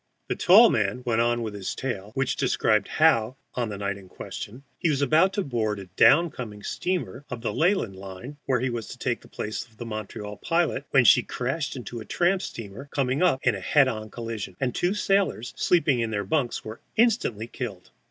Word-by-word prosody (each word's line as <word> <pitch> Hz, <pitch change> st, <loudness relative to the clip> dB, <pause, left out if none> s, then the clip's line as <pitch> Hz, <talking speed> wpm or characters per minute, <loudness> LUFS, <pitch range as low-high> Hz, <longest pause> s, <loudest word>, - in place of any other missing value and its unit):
The -, -, 0 dB
tall 215 Hz, +6 st, +7 dB
man 105 Hz, +3 st, 0 dB
went 115 Hz, -2 st, +2 dB
on 120 Hz, 0 st, +1 dB
with 110 Hz, -2 st, -4 dB
his 100 Hz, -2 st, -4 dB
tale, 105 Hz, -7 st, -4 dB
which 135 Hz, -1 st, 0 dB
described 110 Hz, -5 st, +2 dB
how, 130 Hz, -7 st, +3 dB, 0.2 s
on 120 Hz, -3 st, -2 dB
the 100 Hz, -, -5 dB
night 100 Hz, 0 st, -2 dB
in 95 Hz, -2 st, -14 dB
question, 120 Hz, +8 st, -8 dB, 0.2 s
he 170 Hz, -, +1 dB
was 140 Hz, -2 st, +1 dB
about 160 Hz, +7 st, +4 dB
to 200 Hz, -, 0 dB
board 110 Hz, -7 st, -1 dB
a 100 Hz, -, -7 dB
down 165 Hz, +4 st, +6 dB
coming 105 Hz, -4 st, -8 dB
steamer 180 Hz, -7 st, -3 dB
of 125 Hz, -3 st, -5 dB
the 115 Hz, -, -2 dB
Leyland 165 Hz, -, +1 dB
line 95 Hz, +9 st, -9 dB
(he 130 Hz, -1 st, +1 dB
was 115 Hz, -3 st, -4 dB
to -, -, -9 dB
take -, -, -2 dB
the -, -, -16 dB
place 110 Hz, -, -4 dB
of 115 Hz, -2 st, -23 dB
the 120 Hz, -, -6 dB
Montreal 105 Hz, -1 st, -6 dB
pilot), 165 Hz, -4 st, 0 dB
when 125 Hz, -3 st, +4 dB
she -, -, +7 dB
crashed 135 Hz, +5 st, -3 dB
into 120 Hz, -2 st, -6 dB
a 110 Hz, -, -8 dB
tramp 180 Hz, +2 st, +1 dB
steamer 115 Hz, -, -8 dB
coming 135 Hz, +2 st, 0 dB
up 175 Hz, -8 st, +3 dB
in 120 Hz, -, +3 dB
a 100 Hz, -, -4 dB
head 135 Hz, +8 st, +4 dB
on 110 Hz, -3 st, -4 dB
collision, 115 Hz, -5 st, -6 dB
and 125 Hz, -2 st, 0 dB
two 180 Hz, +3 st, 0 dB
sailors 195 Hz, -, +1 dB
sleeping 155 Hz, -8 st, +2 dB
in 115 Hz, -1 st, 0 dB
their 100 Hz, -2 st, -1 dB
bunks 125 Hz, +1 st, -1 dB
were 110 Hz, +1 st, -7 dB, 0.2 s
instantly 215 Hz, -, +2 dB
killed. 115 Hz, -6 st, -7 dB
120 Hz, 210 wpm, -26 LUFS, 110-145 Hz, 0.2 s, tall